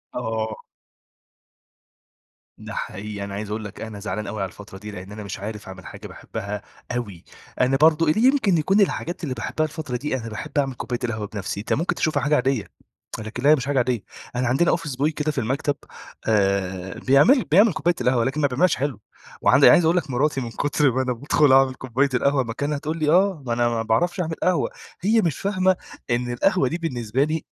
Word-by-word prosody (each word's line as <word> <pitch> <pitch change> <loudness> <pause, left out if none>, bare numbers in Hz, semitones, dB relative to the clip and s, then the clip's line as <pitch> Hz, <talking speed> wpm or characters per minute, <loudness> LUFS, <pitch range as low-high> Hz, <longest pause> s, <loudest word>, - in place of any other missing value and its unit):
آه. 110 -2 -3 2.0
ده - - -9
حقيقي، 100 +1 -5
أنا 100 - -6
عايز 105 +1 -5
أقول 110 +1 -3
لك 105 - -9
أنا 110 -2 -6
زعلان 105 +1 -4
أوي 105 -2 -4
على 95 - -2
الفترة 100 +1 -12
دي 105 +1 -8
لأن 95 0 -9
أنا 105 0 -7
مش 100 - -6
عارف 105 0 -6
أعمل 95 -1 -10
حاجة - - -9
باحبها 105 -2 -6 0.3
أوي، 100 -8 -5 0.4
أنا 130 +2 +3
برضو 155 +2 +4
اللي 215 +10 +3
يمكن 250 - +4
يكون 195 +7 +3
الحاجات 175 -3 -1
اللي 135 - -2
باحبها 140 +6 -2
الفترة 150 -5 -4
دي 140 +2 -2
أنا 115 -2 -6
باحب 120 +7 -6
أعمل 135 -2 +1
كوباية 120 0 -4
القهوة 110 -3 -2
بنَفسي، 100 -1 -5
انت 105 - -2
مُمكن 170 +2 0
تشوفها 145 -4 0
حاجة 150 +1 +3
عادية، 130 -4 0 0.5
لكن 110 +4 -6
لا 145 - +5
هي 155 - +8
مش 130 -3 -4
حاجة 145 -1 0
عادية، 125 -4 +1 0.3
أنا 125 0 0
عندنا 135 +8 +3
office 145 -5 -6
boy 155 - +4
كده 155 0 0
في 145 - -12
المكتب 135 +4 0 0.5
آآ، 95 -3 0
بيعمل 145 - +5
بيعمل 200 +2 +6
كوباية 175 +1 +1
القهوة 125 -1 +2
لكن 135 +5 -1
ما 145 - +4
بيعملهاش 150 +7 +2
حلو، 135 -5 -2 0.4
وعند - - +5
أنا - - +10
عايز 175 - +5
أقول 165 +2 +3
لك 160 -5 -1
مراتي 135 +2 +1
من 115 -2 -5
كُتر 145 0 +1
ما 130 +2 0
أنا 130 -1 0
بادخل 140 +3 +3
أعمل 135 -1 +5
كوباية 130 +2 0
القهوة 135 +2 +2
مكانها 145 +6 -2
تقول 155 +3 -4
لي: 150 -1 +1
"آه 180 -3 +3
ما 120 - -1
أنا 120 0 +2
ما 115 -1 -1
باعرفش 175 - +1
أعمل 165 -2 -1
قهوة"، 180 -1 +2 0.3
هي 220 +4 +3
مش 165 -7 -1
فاهمة 185 -2 +2 0.4
إن 120 +1 0
القهوة 180 +3 +2
دي 165 - -2
بالنسبة 130 -6 -1
لي 155 +1 -2
130 Hz, 210 wpm, -23 LUFS, 110-155 Hz, 2.0 s, أنا